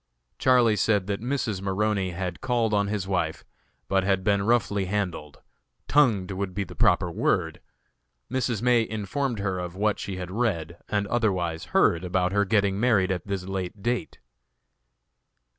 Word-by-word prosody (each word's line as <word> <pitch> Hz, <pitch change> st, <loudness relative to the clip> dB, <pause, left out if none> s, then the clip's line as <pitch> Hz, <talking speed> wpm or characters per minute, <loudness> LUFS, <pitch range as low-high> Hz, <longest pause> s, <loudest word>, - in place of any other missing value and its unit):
Charlie 120 Hz, -4 st, +4 dB
said 105 Hz, -4 st, +2 dB
that 100 Hz, +1 st, -3 dB
Mrs. 120 Hz, -6 st, -2 dB
Maroney 100 Hz, 0 st, 0 dB
had 90 Hz, 0 st, -5 dB
called 120 Hz, -4 st, 0 dB
on 100 Hz, -1 st, +2 dB
his 100 Hz, -2 st, -2 dB
wife, 85 Hz, -4 st, -2 dB, 0.4 s
but 95 Hz, -1 st, +2 dB
had 95 Hz, -1 st, +1 dB
been 100 Hz, 0 st, +2 dB
roughly 105 Hz, -2 st, +1 dB
handled 90 Hz, -7 st, -3 dB, 0.4 s
tongued 115 Hz, -11 st, +3 dB
would 95 Hz, -1 st, -4 dB
be 100 Hz, -, 0 dB
the 95 Hz, -, -10 dB
proper -, -, +2 dB
word. -, -, 0 dB, 0.7 s
Mrs. 120 Hz, -3 st, -1 dB
May 125 Hz, -1 st, +4 dB
informed 110 Hz, +4 st, -2 dB
her 95 Hz, -2 st, -2 dB
of 90 Hz, 0 st, -5 dB
what 105 Hz, +1 st, 0 dB
she 100 Hz, -, -4 dB
had 90 Hz, -1 st, -6 dB
read 85 Hz, -7 st, -2 dB
and 105 Hz, -1 st, 0 dB
otherwise 95 Hz, -7 st, -1 dB
heard 85 Hz, +1 st, +2 dB
about 90 Hz, 0 st, 0 dB
her 100 Hz, 0 st, +2 dB
getting 100 Hz, -1 st, +1 dB
married 105 Hz, -6 st, +3 dB
at 90 Hz, -1 st, -3 dB
this 100 Hz, -2 st, -2 dB
late 95 Hz, +1 st, -5 dB
date. 120 Hz, +1 st, -2 dB
100 Hz, 160 wpm, -26 LUFS, 95-110 Hz, 0.7 s, Charlie